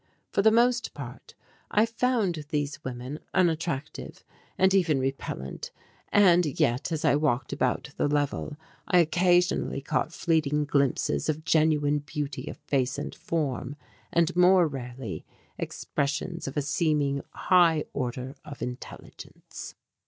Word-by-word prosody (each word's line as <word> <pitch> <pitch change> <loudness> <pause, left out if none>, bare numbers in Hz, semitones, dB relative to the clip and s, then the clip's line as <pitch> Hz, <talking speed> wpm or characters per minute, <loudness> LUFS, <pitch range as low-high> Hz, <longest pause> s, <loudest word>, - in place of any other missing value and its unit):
For - - +2
the 220 - +6
most 240 +2 +2
part - - -9 0.3
I 210 +2 +4
found 225 -9 0
these 145 -1 -2
women 130 +4 -5 0.2
unattractive 165 -5 -1 0.3
and 190 0 +4
even 165 -7 +3
repellent, 130 - -4 0.4
and 180 -4 +6 0.2
yet 125 +8 +1
as 160 -2 -1
I - - +5
walked 140 -3 0
about 130 +1 -1
the - - +2
level 145 0 -1 0.3
I 180 - +4
occasionally 175 -2 +3
caught 140 +3 -1
fleeting 150 -3 +1
glimpses 140 +1 +1
of 155 +1 -2
genuine 150 -2 +3
beauty 145 -1 -5
of - - -8
face 135 -1 -1
and 145 - -4
form, 145 -4 -3 0.4
and 170 +1 +2
more 180 -1 +6
rarely 125 -5 -6 0.4
expressions 150 +4 -3
of 135 - -5
a 145 - +1
seeming 145 -2 +1
high 170 -5 +4
order 130 0 -3
of 145 - -8
intelligence. 125 0 -9
150 Hz, 130 wpm, -27 LUFS, 140-175 Hz, 0.4 s, the